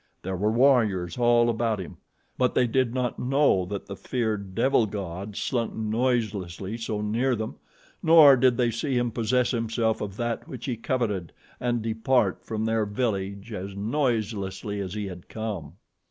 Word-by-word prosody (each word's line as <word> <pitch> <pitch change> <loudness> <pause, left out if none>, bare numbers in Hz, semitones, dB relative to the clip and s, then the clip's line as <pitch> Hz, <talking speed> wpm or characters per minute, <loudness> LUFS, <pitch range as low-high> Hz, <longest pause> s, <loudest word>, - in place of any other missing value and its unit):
There 95 +1 -3
were 105 +4 +1
warriors 115 -8 +3
all 120 0 +4
about 115 -1 0
him; 90 - -8 0.4
but 125 -1 +1
they 125 - +4
did 125 0 +1
not 125 -1 -2
know 135 -8 +3
that 100 +1 -5
the 100 - -7
feared 105 -5 -3
devil 120 -1 +3
god 100 0 -6
slunk 120 0 -1
noiselessly 110 -4 -1
so 110 -2 -3
near 120 +5 +1
them, 110 -1 -5 0.4
nor 160 -4 +8
did 125 -1 +3
they 120 -2 +2
see 130 +3 -1
him 120 -1 0
possess 120 +2 +1
himself 115 -2 0
of 100 -1 -5
that 120 -1 -2
which 125 -3 -7
he 125 - -1
coveted 110 -7 -2 0.3
and 120 -2 -1
depart 110 -2 +1
from 110 0 -3
their 110 -1 +1
village 100 -1 -2
as 95 0 -5
noiselessly 105 -4 -1
as 95 0 -4
he 105 -1 -3
had 90 -2 -9
come. 100 -9 -5
110 Hz, 165 wpm, -26 LUFS, 100-120 Hz, 0.4 s, nor